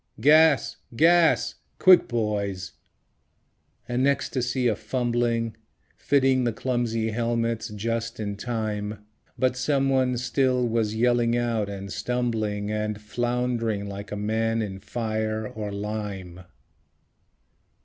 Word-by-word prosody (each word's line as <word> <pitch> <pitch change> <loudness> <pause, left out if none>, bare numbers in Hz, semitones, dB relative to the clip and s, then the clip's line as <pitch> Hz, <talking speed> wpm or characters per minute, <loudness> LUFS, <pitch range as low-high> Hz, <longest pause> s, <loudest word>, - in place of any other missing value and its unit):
Gas! 155 0 +5 0.2
GAS! 170 +4 +4 0.2
Quick, 185 -2 +6
boys! 105 -5 -2 1.2
An 125 +2 +1
ecstasy 130 -2 0
of 110 -4 +1
fumbling, 120 -1 -1 0.4
Fitting 135 -2 +2
the 120 - +1
clumsy 115 -2 -1
helmets 115 0 -1
just 115 +2 -3
in 100 -2 -3
time; 105 -2 -4 0.3
But 130 -1 +1
someone 135 -2 +1
still 125 +1 +1
was 110 -2 0
yelling 120 0 +2
out 115 -4 0
and 100 -1 -6
stumbling 110 -4 -1
And 105 0 -2
flound'ring 115 -1 -1
like 100 0 -7
a - - -2
man 110 +2 0
in 95 -2 -5
fire 110 0 -2
or 105 -2 -5
lime... 100 -3 -5
115 Hz, 110 wpm, -25 LUFS, 105-125 Hz, 1.2 s, Quick